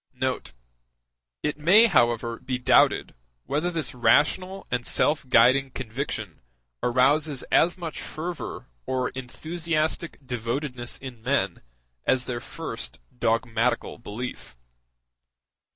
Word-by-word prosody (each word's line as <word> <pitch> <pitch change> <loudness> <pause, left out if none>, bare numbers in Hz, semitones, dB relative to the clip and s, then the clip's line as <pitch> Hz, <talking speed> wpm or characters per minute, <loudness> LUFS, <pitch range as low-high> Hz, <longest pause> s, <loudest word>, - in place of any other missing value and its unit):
*c 130 - +2 0.2
c - - -16 0.5
[ - - -59
It 150 0 -1
may, 190 +9 +7
however, 120 - +2
be 130 -1 -3
doubted 125 +1 +4 0.3
whether 155 +5 0
this 160 -7 -3
rational 150 +11 +2
and 125 -1 0
self 145 +1 +1
guiding 130 +3 +5
conviction 115 - -5 0.4
arouses 135 +3 +2
as 175 +3 +4
much 170 -3 -5
fervor 170 +2 -5 0.2
or 130 -1 0
enthusiastic 160 +5 -3
devotedness 125 +1 -3
in 130 -4 -9
men 110 -8 0 0.4
as 125 -1 +2
their 120 -1 -3
first - - -7 0.2
dogmatical 115 +1 0
belief. 115 - -7
130 Hz, 110 wpm, -26 LUFS, 120-155 Hz, 0.5 s, may